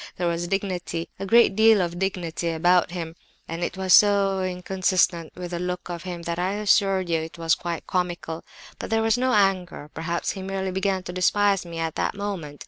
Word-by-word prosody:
There 175 - -1
was 170 0 -1
dignity, 180 -3 -3
a 195 - -4
great 230 -2 +5
deal 220 0 +6
of 175 -1 -2
dignity, 175 -3 -2
about 175 +2 +3
him, 165 -2 -6 0.3
and 165 +1 -4
it 180 - -3
was 190 -1 +2
so 200 -2 +5
inconsistent 185 -2 0
with 180 -1 -7
the 175 - -3
look 180 0 -4
of 170 -1 -5
him 175 -2 -6
that, 170 0 -3
I 185 +2 0
assure 200 -2 +3
you, 170 -3 -1
it 160 +1 -8
was 165 -1 +2
quite 170 -1 -3
comical. 175 -3 -3 0.4
But - - -5
there 225 0 +1
was 225 0 +3
no 255 0 +1
anger. 185 -6 +1
Perhaps 170 +2 -2
he 195 - -7
merely 190 0 -3
began 190 0 -1
to 180 - -7
despise 195 0 +2
me 170 -1 -7
at 165 -1 -2
that - - -1
moment. 190 -8 -5
180 Hz, 205 wpm, -24 LUFS, 170-195 Hz, 0.4 s, deal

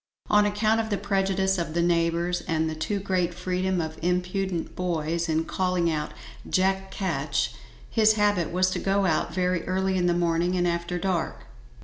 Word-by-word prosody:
On 210 0 +5
account 215 +2 +2
of 220 -1 -2
the 205 - 0
prejudice 195 -2 +1
of 165 -2 -3
the 170 - +2
neighbours, 170 +1 +1
and 160 -1 +1
the 160 - -2
too 180 +6 -2
great 185 -3 -1
freedom 185 +1 -1
of 160 -1 -4
impudent 180 0 -1
boys 170 -1 -1
in 160 +1 +1
calling 180 -1 0
out 150 -1 -2 0.4
"Jack 190 +1 +1
Ketch," 155 -9 -1 0.3
his 220 -1 +4
habit 205 -6 +1
was 185 +1 +2
to - - -2
go 195 0 +1
out 165 -2 +1
very 180 0 0
early 190 +1 0
in 180 -1 +2
the 175 - +2
morning 175 +1 +1
and 175 0 +2
after 170 +1 -1
dark. 170 - -2
180 Hz, 175 wpm, -26 LUFS, 170-190 Hz, 0.4 s, On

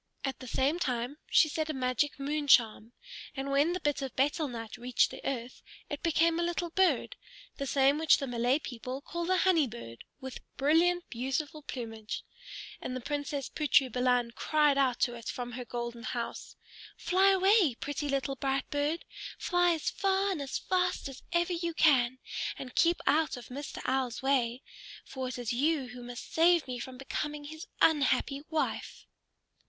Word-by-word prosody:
At 270 - -3
the 255 - -9
same 275 +8 +1
time 250 0 -2
she - - +6
said 310 +1 -2
a 310 - -2
magic 255 +3 0
moon 290 +1 -2
charm: 225 -3 +4 0.5
and 275 +1 -3
when 290 +5 +3
the 365 - -2
bit 295 -4 0
of 270 -2 -5
betel 290 +3 +1
nut 230 -3 -6
reached 245 0 +1
the - - -9
earth, 250 -2 -4 0.3
it 290 - -4
became 330 0 +2
a - - +1
little 345 0 -2
bird, 380 +6 +2 0.4
the 275 - -3
same 275 +2 +3
which 320 -1 +5
the 275 - -3
Malay 245 +1 +1
people 255 -2 -6
call 340 +3 -4
the 370 0 +3
Honey 345 -7 +4
Bird, 115 - -9 0.2
with 265 -2 -7 0.2
brilliant, 340 +5 +3
beautiful 270 +5 -3
plumage. 225 -6 -6 0.6
And 255 - -4
the - - -2
Princess 285 +1 -3
Putri 280 -3 +3
Balan 250 -1 +2
cried 300 +3 +2
out 265 -3 +2
to 240 - +2
it 235 -2 -9
from 245 -1 -4
her 250 +1 -6
golden 235 0 -5
house, 240 -1 -5 0.4
"Fly 380 +2 +3
away, 385 - +4
pretty 290 +3 -4
little 275 -1 -1
bright 270 0 -1
bird! 295 +3 -1 0.3
Fly 355 -1 +2
as 315 - -2
far 390 0 +1
and 335 -6 -2
as 275 -1 -3
fast 360 -5 0
as 270 - -10
ever 345 +1 +1
you 335 -1 -2
can, 260 -6 +4 0.4
and 255 - -8
keep 340 +1 +3
out 310 -3 +2
of 240 - -10
Mr. 280 +3 -6
Owl's 260 -1 -1
way. 260 -2 +1 0.4
For 260 -1 -5
it 250 - -5
is 240 -1 -2
you 280 +1 +1
who 245 0 -9
must 245 0 -8
save 335 -1 +4
me 250 -1 -4
from 255 +1 -7
becoming 295 +2 -4
his 315 +3 -9 0.2
unhappy 275 -2 +3
wife." 315 -1 -2
275 Hz, 180 wpm, -30 LUFS, 250-320 Hz, 0.6 s, she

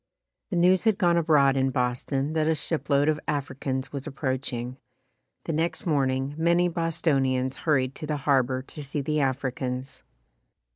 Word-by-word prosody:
The 185 - -3
news 180 +3 +4
had 220 -3 +3
gone 175 -3 +3
abroad 150 -5 +4
in 135 0 +2
Boston 130 +3 -1
that 155 -1 +1
a 160 - +3
shipload 145 -2 0
of 155 -1 +2
Africans 135 -2 -3
was 140 +1 -5
approaching. 130 -3 -3 0.7
The 165 - -3
next 165 +3 -1
morning 135 -3 0
many 170 +2 +3
Bostonians 140 -6 0
hurried 135 -5 +1
to 155 - -6
the 150 -1 -1
harbor 130 -2 +1
to 150 +2 -9
see 145 +1 -3
the 150 +2 0
Africans. 130 -1 -2
140 Hz, 150 wpm, -26 LUFS, 130-160 Hz, 0.7 s, news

